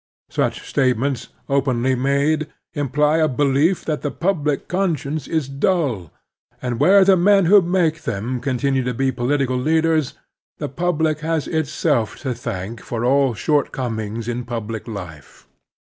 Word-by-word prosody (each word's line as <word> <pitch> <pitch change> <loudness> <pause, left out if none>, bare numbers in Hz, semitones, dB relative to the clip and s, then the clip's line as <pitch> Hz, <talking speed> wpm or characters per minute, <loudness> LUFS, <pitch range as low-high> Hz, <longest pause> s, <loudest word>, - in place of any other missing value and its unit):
Such - - -1
statements, 130 0 0 0.2
openly 130 -2 +1
made, 140 +4 +1 0.3
imply 150 +1 +1
a 160 -1 +3
belief 145 +6 +1
that 155 -2 -2
the 145 - -1
public 150 -5 -1
conscience 160 -5 -1
is 160 -4 -1
dull; 135 - -1 0.5
and 125 -2 -3
where 195 +1 +6
the 195 0 +6
men 195 +1 +4
who 200 +4 +7
make 170 -3 +1
them 120 0 -3
continue 135 +1 0
to 125 -1 -2
be 135 +1 +1
political 130 +1 0
leaders, 160 +1 +1 0.4
the - - -4
public 160 0 0
has 160 -1 -1
itself 145 -7 0
to 130 -4 -2
thank 100 +1 -5
for 120 0 -3
all 135 -1 +3
shortcomings 115 -3 -1
in 120 +1 -2
public 115 -2 -5
life. 90 - -9
140 Hz, 140 wpm, -21 LUFS, 120-160 Hz, 0.5 s, who